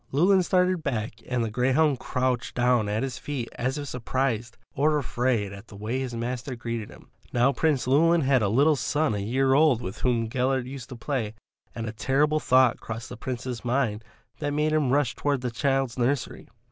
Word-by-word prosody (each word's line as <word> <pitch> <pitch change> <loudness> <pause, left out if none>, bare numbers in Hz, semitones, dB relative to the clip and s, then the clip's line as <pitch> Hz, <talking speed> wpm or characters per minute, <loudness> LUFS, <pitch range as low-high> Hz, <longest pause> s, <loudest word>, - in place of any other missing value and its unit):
Llewelyn 185 +7 +4
started 180 -1 +2
back 115 -6 -3
and 125 -2 0
the 110 - -4
greyhound 135 +4 +2
crouched 125 -1 -1
down 120 -3 +2
at 105 +3 -1
his 130 -3 -4
feet 135 -5 -4
as 130 +4 -2
if 145 -1 -5
surprised 125 -2 -2 0.2
or 150 +2 +2
afraid 120 -5 -1
at 100 +3 -11
the 105 - -13
way 110 +6 -3
his 130 -3 -4
master 125 +2 -4
greeted 115 -2 -4
him. - - -16 0.2
Now 125 +3 +3
Prince 145 -2 +1
Llewelyn 165 +6 +4
had 135 -3 +3
a 100 - +1
little 145 +8 +4
son 145 +1 0
a 105 - -2
year 130 +6 +1
old 145 -4 +4
with 95 -5 -6
whom 120 -2 +1
Gellert 130 +2 0
used 130 -2 -8
to 125 - -7
play, 115 -4 -3 0.4
and 115 - -4
a 110 - -3
terrible 145 +7 +1
thought 130 -3 +4
crossed 115 +1 -6
the - - -7
Prince's 125 0 -5
mind 120 -4 0 0.4
that 145 -1 -2
made 150 +1 +1
him 150 -4 +2
rush 140 -3 +2
towards 140 -3 -1
the 125 - -1
child's 135 -1 0
nursery. 130 +2 -1
130 Hz, 195 wpm, -26 LUFS, 115-140 Hz, 0.4 s, Llewelyn